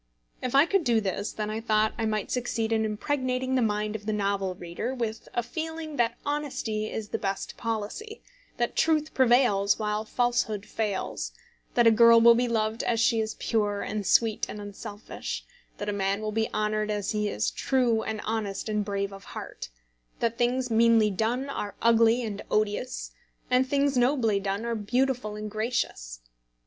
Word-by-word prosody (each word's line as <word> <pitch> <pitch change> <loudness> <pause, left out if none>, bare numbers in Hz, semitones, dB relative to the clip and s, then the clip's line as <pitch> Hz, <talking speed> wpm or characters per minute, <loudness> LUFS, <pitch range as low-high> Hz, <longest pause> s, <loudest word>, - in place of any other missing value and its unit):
If 255 +1 -2
I 280 +3 +7
could 390 +1 +1
do 235 -5 +3
this, 200 0 -2
then 215 0 -3
I 220 +1 -3
thought 215 -1 +2
I 225 -1 -1
might 215 -2 -2
succeed 235 -2 -1
in 220 -1 +2
impregnating 255 +3 -1
the 260 - +3
mind 210 -1 0
of 210 -1 -7
the 215 - +1
novel 200 -2 -1
reader 175 +9 -4
with 225 -3 -4
a 240 - +1
feeling 320 +2 -5
that 235 0 +1
honesty 260 -7 -2
is 215 -2 -5
the - - -2
best 195 -1 -3
policy; 230 - -4 0.3
that 240 0 -1
truth 310 -1 +2
prevails 240 -6 +4
while 210 0 -1
falsehood 220 -3 0
fails; 210 -2 -3 0.4
that 240 - +5
a 230 - +8
girl 230 +1 +7
will 235 +1 +8
be 245 +1 +1
loved 220 0 0
as 230 -1 0
she 230 0 +3
is 220 0 -3
pure, 205 -3 0
and 210 -2 -3
sweet, 225 -2 +3
and 210 - -6
unselfish; 205 +1 -6 0.3
that 205 - -5
a 205 - 0
man 195 0 0
will 215 0 -3
be 220 +1 -1
honoured 215 0 0
as 205 -2 -1
he 210 -1 0
is 105 - -1
true, 245 -4 +1
and 220 -1 -4
honest, 215 -2 -2
and 210 -1 0
brave 200 -1 -2
of 195 - -10
heart; - - -7 0.5
that 230 -1 0
things 245 +1 0
meanly 225 -1 +5
done 230 +7 -1
are 210 -7 -4
ugly 230 +1 +4
and 210 -3 -4
odious, 215 +4 -1 0.4
and 255 +1 +4
things 280 0 +2
nobly 245 -5 +2
done 210 +3 -2
beautiful 245 0 0
and 210 0 -6
gracious. 205 - -2
220 Hz, 180 wpm, -27 LUFS, 210-245 Hz, 0.5 s, a